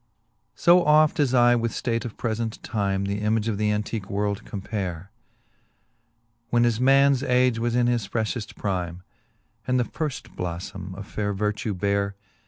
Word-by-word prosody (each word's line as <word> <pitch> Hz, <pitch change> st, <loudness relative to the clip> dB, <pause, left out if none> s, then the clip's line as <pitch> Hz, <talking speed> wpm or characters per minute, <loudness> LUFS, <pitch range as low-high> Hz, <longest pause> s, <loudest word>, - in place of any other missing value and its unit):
I. 170 Hz, -, +8 dB
O 180 Hz, 0 st, +7 dB
oft 155 Hz, -1 st, +4 dB
as 140 Hz, -4 st, +3 dB
I 120 Hz, 0 st, +6 dB
with 115 Hz, -1 st, 0 dB
ftate 115 Hz, -1 st, -2 dB
of 115 Hz, -, -7 dB
prefent 115 Hz, -1 st, -2 dB
time 100 Hz, -3 st, -1 dB
The 100 Hz, +1 st, -2 dB
image 110 Hz, +1 st, +1 dB
of 105 Hz, -3 st, -1 dB
the 105 Hz, 0 st, +2 dB
antique 105 Hz, -1 st, -3 dB
world 100 Hz, 0 st, -1 dB
compare. 95 Hz, -3 st, -5 dB, 1.4 s
When 120 Hz, 0 st, +3 dB
as 120 Hz, -2 st, +1 dB
mans 135 Hz, 0 st, +5 dB
age 125 Hz, -3 st, +2 dB
was 120 Hz, 0 st, 0 dB
in 125 Hz, -1 st, +3 dB
his 120 Hz, -4 st, 0 dB
frefhefl: 110 Hz, +1 st, -3 dB
prime, 90 Hz, -3 st, -3 dB, 0.6 s
And 125 Hz, 0 st, +2 dB
the -, -, +3 dB
firft 150 Hz, +4 st, -5 dB
bloflbme 90 Hz, +2 st, -5 dB
of 100 Hz, -, -7 dB
faire 105 Hz, 0 st, -2 dB
vertue 105 Hz, +1 st, -1 dB
bare. 100 Hz, +1 st, 0 dB
110 Hz, 165 wpm, -25 LUFS, 100-120 Hz, 1.4 s, I